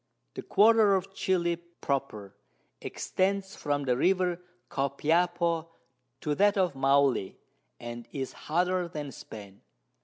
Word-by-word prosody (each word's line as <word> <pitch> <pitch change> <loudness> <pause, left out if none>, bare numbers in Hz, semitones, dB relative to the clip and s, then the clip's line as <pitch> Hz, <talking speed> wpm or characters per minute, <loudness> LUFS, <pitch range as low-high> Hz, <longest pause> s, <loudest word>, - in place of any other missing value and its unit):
The - - -6
Quarter 215 -2 +5
of 195 +1 -3
Chili 175 -3 0
proper 140 - -4 0.5
extends 195 0 -1
from 145 -1 -1
the 125 -2 +1
River 180 +4 +1 0.3
Copiapo 165 +4 0 0.5
to 150 - -1
that 205 +5 +3
of 185 -5 +2
Maule, 135 -6 +2 0.4
and 120 0 -7
is 135 -3 -4
hotter 180 +2 0
than 150 -4 -6
Spain. 100 -4 -11
170 Hz, 115 wpm, -29 LUFS, 135-185 Hz, 0.5 s, Quarter